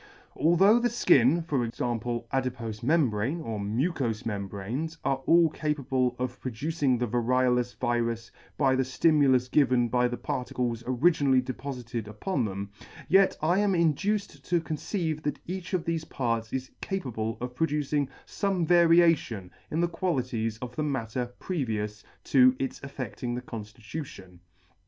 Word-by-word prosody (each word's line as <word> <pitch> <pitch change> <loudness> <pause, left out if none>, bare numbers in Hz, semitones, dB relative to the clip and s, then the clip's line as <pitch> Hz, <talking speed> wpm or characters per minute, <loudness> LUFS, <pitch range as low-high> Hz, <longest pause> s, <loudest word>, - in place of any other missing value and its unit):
Although 190 +8 +5
the 240 - +2
fkin, 160 - +4
for 140 -7 0
example, 120 0 -2
adipofe 125 -5 -2
membrane, 135 -1 +1
or 115 -9 -4
mucous 115 - -1
membranes 105 +9 -4
are 135 -1 +1
all 165 -2 +5
capable 135 -5 -1
of 125 0 -4
producing 135 +2 0
the 125 - 0
variolous 125 +1 +1
virus 115 -1 -1 0.3
by 135 -3 +3
the 130 - +2
ftimulus 130 -2 +3
given 125 -4 +3
by 125 0 +2
the 120 0 -4
particles 125 -2 -3
originally 135 0 +3
depofited 125 -3 -5
upon 120 - -2
them, 100 0 -5 0.4
yet 195 +1 +5
I 175 +5 +3
am 205 -2 +2
in 170 -3 +3
duced 200 -4 -2
to 175 0 +2
conceive 160 0 -3
that 145 -1 -2
each 185 +1 -4
of 175 - -2
thefe 165 -1 -2
parts 115 -4 -1
is 130 -1 -4
capable 115 - -3
of 125 0 -5
producing 150 -1 0 0.2
fome 195 -4 -1
variation 165 - +4 0.2
in 160 - 0
the 175 - +3
qualities 125 -11 -2
of 125 0 -7
the - - -2
matter 125 -4 -2
previous 105 - -3 0.2
to 130 -1 +5
its 135 - -3
affe&ing 130 -3 -5
the 125 - -4
conftitution. 110 - -8
130 Hz, 140 wpm, -28 LUFS, 120-160 Hz, 0.4 s, Although